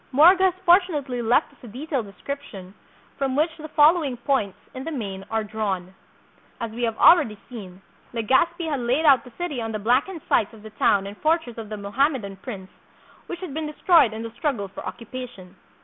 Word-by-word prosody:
Morga 350 +8 +6
has 370 - +3
fortunately 315 -9 +3
left 235 +2 +2
us - - -25
a 245 - -11
detailed 255 0 -4
de 200 - -13
scription 220 -10 -7 0.5
from 270 -1 0
which 315 +2 +1
the 310 -1 -8
following 300 -3 +3
points 235 -6 -1 0.2
in 260 - -6
the 325 - -5
main 200 -9 -5
are 225 -1 0
drawn. 200 -4 -3 0.7
As 230 -1 -4
wo 240 +2 -5
have 225 -1 -2
already 290 -12 +6
seen, 195 -6 -10 0.3
Legazpi 265 - +1
had 290 -4 -1
laid 250 +6 0
out 270 -5 +6
the 250 - -13
city 335 -8 -3
on 225 0 -3
the 215 - -2
blackened 255 - +1
site 210 - +2
of 215 -2 -14
the 215 - -10
town 200 -2 +2
and 200 +1 -7
fortress 310 -7 0
of 220 -2 -7
the 215 - -5
Mohammedan 205 0 -1
prince, 195 -3 -8 0.6
which 350 0 -6
had 360 -7 -6
been 310 +1 -3
destroyed 305 - +4
in 220 +1 -6
the 230 - -6
struggle 235 -4 -2
for - - -9
occupation. 230 -6 -8
245 Hz, 195 wpm, -24 LUFS, 215-300 Hz, 0.7 s, Morga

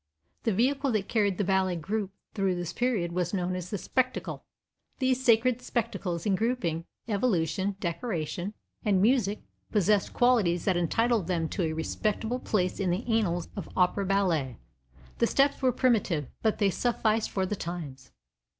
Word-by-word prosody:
The 225 - +3
vehicle 270 +6 +1
that 205 -3 0
carried 205 -5 +1
the - - +1
ballet 190 -2 +1
through 200 +4 -2 0.5
this 175 -1 -4
period 225 -9 0
was 180 +2 -1
known 180 -1 -1
as 180 -1 -5
the 205 - -2
"spectacle." 255 +6 -2 0.5
These 260 -1 +1
sacred 235 +1 +4
spectacles, 205 -9 -2
in 205 - +2
grouping, 190 -7 0 0.2
evolution, 195 -4 0
decoration 175 0 -3 0.3
and 200 -3 +3
music, 210 -1 +2 0.3
possessed 210 -1 +2
qualities 215 -9 +3
that 190 - +3
entitle 225 +7 +2
them 170 -2 -1
to 200 - -2
a 160 -2 0
respectable 215 +8 -1
place 185 -7 0
in 195 -2 +1
the 180 +7 -1
annals 195 -7 +1
of 200 - -6
opera 185 +2 +2
ballet. 170 - +1 0.6
The - - +4
steps 280 +1 +2
were 260 -1 +4
primitive, 210 - +1
but 220 -1 +1
they 200 -2 +3
sufficed 225 0 +1
for 190 -1 -1
the 210 - -2
times. 150 -8 -6
200 Hz, 155 wpm, -28 LUFS, 175-230 Hz, 0.6 s, sacred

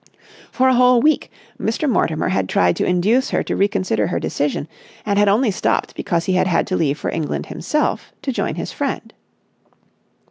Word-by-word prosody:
For 260 0 +2
a 260 - +4
whole 250 0 +5
week 305 +4 +2 0.3
Mr. 230 +7 -1
Mortimer 160 - +1
had 95 -1 -1
tried 90 -1 +2
to - - 0
induce 205 +9 +2
her - - 0
to - - -3
reconsider 190 - 0
her 85 - -1
decision, 145 - -2 0.4
and 205 -1 +1
had 205 - +4
only 215 +3 +3
stopped 190 - -1
because 170 -1 -2
he 190 - 0
had 185 +1 +2
had 180 - +1
to 185 - -2
leave 150 -4 0
for - - -3
England 160 -2 -3
himself, 300 -1 -2
to 270 - -1
join - - -2
his - - -5
friend. - - -4
200 Hz, 185 wpm, -20 LUFS, 160-250 Hz, 0.4 s, whole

